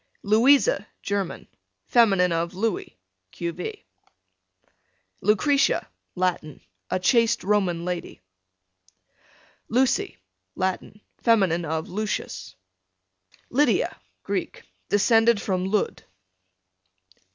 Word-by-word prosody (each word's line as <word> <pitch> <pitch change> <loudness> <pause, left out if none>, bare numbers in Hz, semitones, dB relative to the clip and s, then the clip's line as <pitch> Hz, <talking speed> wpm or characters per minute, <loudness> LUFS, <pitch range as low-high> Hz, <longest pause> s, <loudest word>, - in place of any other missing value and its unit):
Louisa, 260 - +4 0.2
German. 200 -3 -3 0.4
fem. 230 -4 +4 0.2
of 170 +2 -1
Louis, 210 - -2 0.4
q.v. 410 - -5 1.4
Lucretia, 275 +7 +2 0.3
Latin, 180 -4 -2 0.3
a - - 0
chaste 230 +4 +2
Roman 185 -4 +1
lady. 180 -1 -5 1.5
Lucy, 255 - +1 0.4
Latin, 190 +2 -3 0.2
fem. 230 -4 +4 0.2
of 160 0 -3
Lucius. 180 - -4 1.0
Lydia. 270 -1 +2 0.3
Greek, - - -4 0.3
descended 225 +2 +4
from 185 -2 -1
Lud. 205 +2 -1
205 Hz, 75 wpm, -24 LUFS, 180-230 Hz, 1.5 s, Louisa